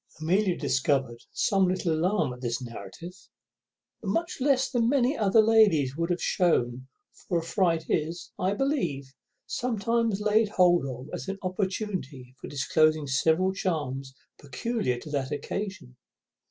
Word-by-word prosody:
Amelia 180 +3 +1
discovered 130 -2 0
some 195 -2 +2
little 180 -2 0
alarm 160 -4 +1
at 125 - -12
this 120 0 -2
narrative, 120 - -9 0.9
but - - -7
much 340 -4 -1
less 265 -1 +3
than 235 -2 +1
many 270 +1 +2
other 215 -2 +4
ladies 200 -12 +4
would 170 +2 -1
have 175 0 0
shewn, 130 -8 +1 0.4
for 175 - +1
a 165 - -1
fright 170 -2 +1
is, 165 +3 -2
I 190 +2 +1
believe, 175 - -1 0.3
sometimes 230 -2 0
laid 215 +1 +2
hold 175 -7 +3
of 130 +2 -8
as - - -5
an 195 0 -3
opportunity 185 - -3
of - - -6
disclosing 155 +2 +2
several 160 +8 +2
charms 135 -9 -3 0.2
peculiar 145 - -2
to 150 - -9
that 135 -3 -2
occasion. 170 -1 -5
175 Hz, 140 wpm, -27 LUFS, 135-205 Hz, 0.9 s, other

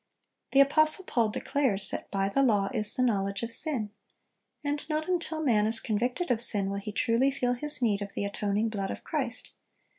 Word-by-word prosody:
The 275 - +7
apostle 310 +5 +5
Paul 230 -9 0
declares 215 -3 -1
that - - -6
"by 195 -1 -1
the 200 +8 0
law 205 -7 +2
is 215 -3 +2
the 255 - +1
knowledge 200 -3 -1
of 230 - -4
sin;" 230 -4 +1 0.7
"and 290 0 -2
not 310 0 -2
until 335 -3 -2
man 215 -6 +2
is 225 +1 +3
convicted 245 +10 -2
of 230 -2 +1
sin, 200 -4 +2
will 200 - -3
he 210 +1 -6
truly 230 +5 +1
feel 250 -2 -1
his 290 +1 -1
need 210 -3 +1
of 200 0 -7
the - - -2
atoning 205 +2 -1
blood 200 -3 -4
of - - -7
Christ.... - - -3
230 Hz, 200 wpm, -28 LUFS, 205-275 Hz, 0.7 s, The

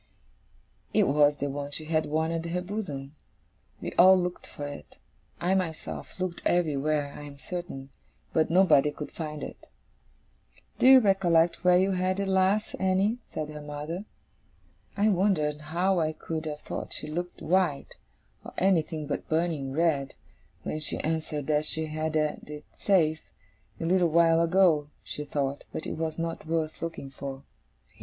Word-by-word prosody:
It - - +6
was 145 +1 +4
the 140 - -2
one 140 0 -4
she 155 +2 -4
had 155 0 0
worn 160 +2 0
at 165 0 -2
her 180 +2 -1
bosom. 155 -8 -5 0.7
We - - -4
all 185 +2 +9
looked 180 0 -3
for 145 - -7
it; 145 - -9 0.4
I 180 +3 +1
myself 180 -1 -3
looked 185 -2 -3
everywhere, 150 -3 +1
I - - -8
am 145 -1 -10
certain 140 -5 -6 0.4
but 160 - +2
nobody 165 -5 +5
could 150 0 -7
find 150 -2 -5
it. - - -9 1.1
'Do - - +5
you 265 0 +10
recollect 175 -5 +3
where 180 0 +6
you 190 +2 +3
had 185 +1 0
it 200 - -1
last, 190 +2 +2
Annie?' 190 +5 +2
said 155 -1 -5
her 150 0 -7
mother. 150 +6 -5 0.9
I 210 +2 +4
wondered 175 -7 +1
how 175 +4 +1
I 155 -1 0
could 160 0 -5
have 150 -1 -5
thought - - -5
she - - -4
looked 175 +3 -4
white, 175 -4 +1 0.5
or - - -10
anything 165 -5 +1
but 145 - -4
burning 160 -4 0
red, 145 -2 +1 0.5
when 155 - -3
she 155 - +1
answered 155 -2 -2
that 150 0 +1
she 160 0 -1
had 155 0 -3
had 150 -1 -1
it 150 0 -8
safe, 160 -5 +2 0.6
a - - -3
little 180 0 +3
while 165 0 +4
ago, 170 -4 +3
she 150 - -5
thought, 140 -1 -2
but - - -5
it - - -3
was 160 -1 -3
not 165 -1 -4
worth 160 -1 -2
looking 165 -5 -5
for. 135 0 -7
160 Hz, 165 wpm, -28 LUFS, 150-180 Hz, 1.1 s, you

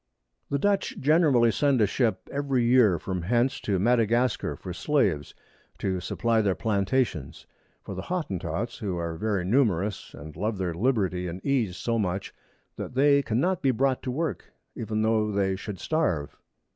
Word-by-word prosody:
The 140 - +1
Dutch 200 +6 0
generally 140 -6 +4
send 140 +1 +2
a 105 - +5
Ship 105 -2 0
every 140 -3 0
Year 120 -7 +5
from 90 0 -4
hence 120 +8 +1
to 100 -2 0
Madagascar 120 +3 +1
for 90 - -7
Slaves, 95 - 0 0.4
to 95 -2 -1
supply 115 +5 0
their 100 -3 +1
Plantations; 100 - -1 0.4
for - - -7
the 95 - -5
Hotentots, 100 - -3
who 100 -6 -3
are 85 -1 -3
very 100 0 -1
numerous, 105 -4 0
and 75 +2 -10
love 105 0 -2
their 90 -3 -2
Liberty 95 -3 0
and 90 +2 -5
Ease 120 -10 0
so 115 -1 -1
much, 95 -1 -2 0.4
that - - -6
they 140 +1 +5
cannot 140 +10 0
be 135 - +2
brought 130 +1 +1
to 130 - -4
work, 135 - -3 0.2
even 110 -1 -2
tho 110 -1 +2
they 100 -1 +1
should 95 0 -7
starve. 90 - -1
110 Hz, 160 wpm, -26 LUFS, 95-130 Hz, 0.4 s, a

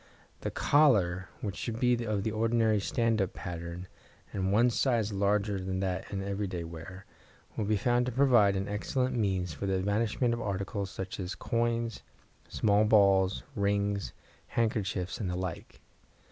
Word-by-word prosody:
The - - -3
collar, 95 -12 +3
which 100 -2 -3
should 115 -1 -4
be 125 -1 +2
of 105 -3 -1
the 110 - -1
ordinary 110 -1 +2
"stand 115 +1 +1
up" 95 - -1
pattern 85 0 -6 0.5
and 95 -1 -1
one 120 +4 +4
size 115 -4 +1
larger 100 0 +1
than 95 0 -3
that 95 -1 -3
in 95 -1 -3
every 100 +1 -2
day 90 -2 -4
wear, 85 +4 -9 0.5
will 110 - -1
be 105 +1 +2
found 120 +4 +1
to - - -1
provide 120 -6 +4
an 95 +1 -2
excellent 125 +5 -1
means 95 -6 0
for 100 - -4
the 95 - +1
evanishment 110 +5 +1
of 120 - -3
articles 100 0 -3
such 95 0 -6
as 90 0 -4
coins, 115 -1 -1 0.5
small 105 0 +3
balls, 100 -3 +4
rings, 100 0 0 0.4
handkerchiefs, 105 -5 -1
and 100 -5 -2
the 90 - -2
like. 90 -2 -5
100 Hz, 160 wpm, -30 LUFS, 95-115 Hz, 0.5 s, one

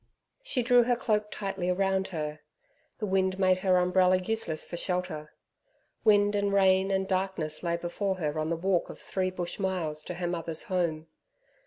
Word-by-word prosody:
She 295 - -1
drew 245 0 +6
her 245 0 +2
cloak 210 -3 0
tightly 195 -4 -2
round 190 +1 +1
her. 155 -3 -4 0.6
The 215 - -3
wind 190 -1 +1
made 185 -1 +3
her 185 -1 +3
umbrella 180 +1 +4
useless 185 -4 -1
for - - -6
shelter. 180 -4 -2 0.7
Wind 205 -1 +4
and 200 -1 +1
rain 190 -1 +4
and 190 0 0
darkness 185 -5 -1
lay 170 -1 0
before 190 +3 -2
her 155 -3 -2
on 155 0 -1
the 170 - 0
walk 180 0 0
of - - -8
three 185 -1 -2
bush 180 0 -5
miles 175 -6 -2
to 180 - -5
her 175 0 -3
mother's 165 -2 -3
home. 170 -6 -1
185 Hz, 175 wpm, -29 LUFS, 175-195 Hz, 0.7 s, drew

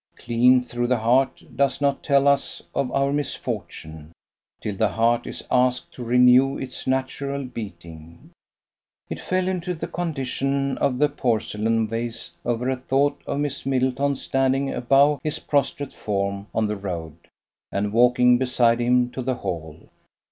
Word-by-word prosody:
Clean 125 +2 +3
through 120 0 -2
the 125 0 +2
heart, 125 +4 +2
does 140 -2 +1
not 140 -1 +1
tell 140 -1 +3
us 140 -1 +1
of 125 -2 -1
our 140 0 +1
misfortune, 80 - -5 0.5
till 105 - -4
the 110 +3 +2
heart 115 +3 +1
is - - -7
asked 125 0 +1
to 125 - -7
renew 125 +3 +5
its 130 0 -7
natural 135 +1 -2
beating. 85 -8 -10 0.8
It - - -4
fell 185 0 -1
into 180 -1 -2
the 160 - -4
condition 140 -4 -2
of 125 -2 +1
the 150 +3 +4
porcelain 115 -4 0
vase 115 +1 -4
over 120 +1 -1
a 130 0 0
thought 140 +3 0
of 140 - -1
Miss 145 -2 -3
Middleton 135 +1 0
standing 135 +1 0
above 140 +3 +3
his 155 0 -2
prostrate 145 -2 -1
form 100 -1 -3
on 110 - 0
the 105 0 -2
road, 85 -5 -5 0.6
and 100 +1 -1
walking 125 +1 +5
beside 125 -2 +2
him 125 0 +2
to 130 - -5
the 130 0 -1
Hall. 80 -7 -6
125 Hz, 150 wpm, -23 LUFS, 115-140 Hz, 0.8 s, renew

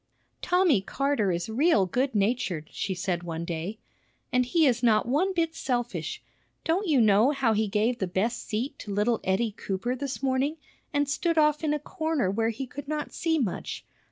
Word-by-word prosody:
"Tommy 355 - +3
Carter 275 -2 0
is 170 0 -2
real 235 - +3
good 255 +7 -1
natured," 195 -7 0
she 190 - -3
said 180 -1 -1
one 170 -1 -4
day. 170 +5 -4 0.6
"And 250 -1 +3
he 325 +4 +3
is 240 -4 +2
not 225 -2 +3
one 310 +10 +2
bit 330 -3 0
selfish. 245 -6 -3 0.4
Don't 365 +5 0
you 295 -5 +4
know 215 +2 +5
how 270 -6 +2
he 215 0 +1
gave 220 +4 +1
the 190 - -1
best 205 +7 -1
seat 230 +6 -3
to 210 - -7
little 210 +4 +1
Eddie 210 +4 +1
Cooper 200 +6 -2
this 275 +1 -5
morning, 270 +4 +1 0.3
and 290 -1 +1
stood 330 +4 0
off 300 0 +3
in 305 - +1
a 300 - +1
corner 315 - -1
where 225 +3 +1
he 250 +4 -4
could 280 +3 -9
not 300 0 -3
see 330 -2 0
much? 230 - -3
245 Hz, 185 wpm, -27 LUFS, 205-295 Hz, 0.6 s, know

